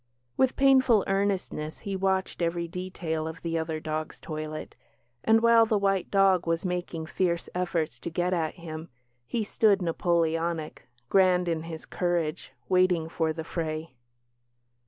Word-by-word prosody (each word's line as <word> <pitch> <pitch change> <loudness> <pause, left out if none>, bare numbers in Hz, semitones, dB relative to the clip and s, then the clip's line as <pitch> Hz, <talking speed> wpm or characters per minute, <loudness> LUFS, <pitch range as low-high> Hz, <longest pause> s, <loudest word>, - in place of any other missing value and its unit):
With 260 -1 +2
painful 260 -5 +5
earnestness 195 -6 -1
he 200 -1 -4
watched 190 -1 0
every 170 0 0
detail 170 -3 -4
of 160 0 -8
the 165 -1 -1
other 160 -1 -3
dog's 155 0 -4
toilet; 155 -1 -6 0.5
and 225 0 +4
while 230 -1 +6
the 215 - +2
white 195 -2 +1
dog 195 -3 +3
was 165 +2 0
making 175 -3 -3
fierce 170 0 -1
efforts 170 -3 -1
to - - -5
get 175 +2 0
at 160 -3 -1
him, 165 -1 -8 0.4
he 225 - -1
stood 210 -1 +3
Napoleonic, 165 -4 -1 0.2
grand 180 +1 +4
in 165 -2 0
his 160 -1 -7
courage, 170 -5 -2 0.2
waiting 180 -3 +3
for 160 -1 0
the 160 0 -5
fray. 160 -2 -4
170 Hz, 145 wpm, -27 LUFS, 160-190 Hz, 0.5 s, while